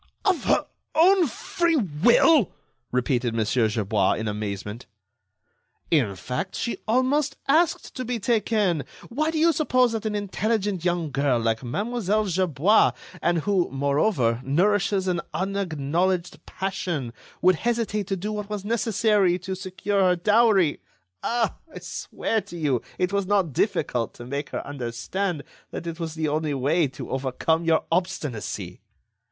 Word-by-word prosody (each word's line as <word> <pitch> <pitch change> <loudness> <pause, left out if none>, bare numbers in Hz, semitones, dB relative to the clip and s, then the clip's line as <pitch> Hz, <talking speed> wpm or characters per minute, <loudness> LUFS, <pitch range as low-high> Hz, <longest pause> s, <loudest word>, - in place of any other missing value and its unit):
"Of 380 -4 +2
her - - +3 0.3
own 355 +1 +5
free 335 +7 0
will!" 235 - +4 0.4
repeated 125 -2 0
Mon. 110 -1 +1
Gerbois, 110 -3 +1
in 110 - -3
amazement. 105 +1 -4 1.0
"In 125 - +2
fact, 125 - -4
she 235 - -3
almost 270 +5 +1
asked 320 +4 +2
to 255 - -2
be 245 0 -2
taken. 210 - +1 0.3
Why, 305 +6 0
do 320 - -2
you 330 +1 +4
suppose 255 -6 +2
that 225 -1 -2
an 210 - -2
intelligent 205 -2 -1
young 175 -4 0
girl 135 -1 +2
like 115 +1 0
Mlle. 215 - -2 0.2
Gerbois, 185 - +3 0.3
and 170 -1 +2
who, 190 0 +1
moreover, 135 - +1
nourishes 190 +5 +2
an 175 -2 0
unacknowledged 180 -1 -1
passion, 175 -10 -3 0.3
would 185 -1 +5
hesitate 225 -3 -1
to 195 - -1
do 205 +4 -4
what 210 -1 -5
was 205 -2 -4
necessary 210 -4 +2
to 190 +1 -5
secure 190 +1 -2
her 180 -1 +4
dowry. 205 -3 +3 0.4
Ah! 235 -1 0
I - - -9
swear 220 -1 -3
to 175 - -10
you 140 -7 0 0.2
it 180 +1 0
was 200 -2 0
not 195 -7 +1
difficult 120 -1 0
to 120 - -9
make 140 +3 -4
her - - -4
understand 145 +7 -3 0.3
that - - -6
it 165 0 -5
was 160 -2 -4
the 160 -1 -1
only 150 0 -1
way 145 +5 +2
to 130 - -8
overcome 135 +5 0
your 160 -1 +3
obstinacy." 165 - -2
180 Hz, 145 wpm, -25 LUFS, 140-215 Hz, 1.0 s, own